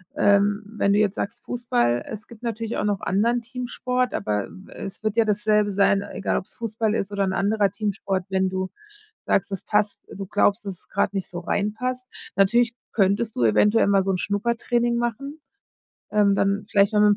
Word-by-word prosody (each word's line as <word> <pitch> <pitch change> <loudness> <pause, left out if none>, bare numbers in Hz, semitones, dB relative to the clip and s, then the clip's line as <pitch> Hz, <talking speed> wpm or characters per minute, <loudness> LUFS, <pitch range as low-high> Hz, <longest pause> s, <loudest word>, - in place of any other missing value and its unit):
ähm, 205 +1 +3
wenn 205 -1 0
du 205 - +3
jetzt 210 -2 +2
sagst 230 +4 -4
Fußball, 120 - 0
es 215 -1 -7
gibt 230 -2 -14
natürlich 230 -1 -3
auch - - -1
noch 205 -3 0
anderen 230 +5 +1
Teamsport, 250 0 -2
aber, 105 -2 -1 0.2
äh, - - -8
es 195 - -9
wird 215 -1 -1
ja 230 -1 +4
dasselbe 210 -1 +2
sein, 200 0 +3
egal 200 0 -2
ob's - - -6
Fußball 225 -1 -1
ist 200 -1 -2
oder 200 -1 0
'n 190 - -1
anderer 205 0 +2
Teamsport. 200 -2 -2
Wenn 190 -1 +1
du 185 0 -3 0.6
sagst, 195 - +1
es 195 - -3
passt 210 -1 -1
du 195 - -6
glaubst, 205 +1 +1
dass 190 -3 -6
es - - -22
grad - - 0
nicht 195 -2 -3
so 175 - -7
rein 200 +4 -1
passt. 255 +2 -4 0.3
Natürlich 230 +5 +3 0.2
könntest 205 +2 +1
du 120 - 0
eventuell 210 - +4
mal 200 -1 +4
so 195 - -2
'n 185 - 0
Schnuppertraining 235 +4 0
machen. 275 +6 -3 0.7
Ähm, 205 -1 +3
dann 200 +1 +1
vielleicht 200 +1 +3
mal 210 - +3
mit 210 -1 +5
205 Hz, 195 wpm, -24 LUFS, 195-230 Hz, 0.7 s, mit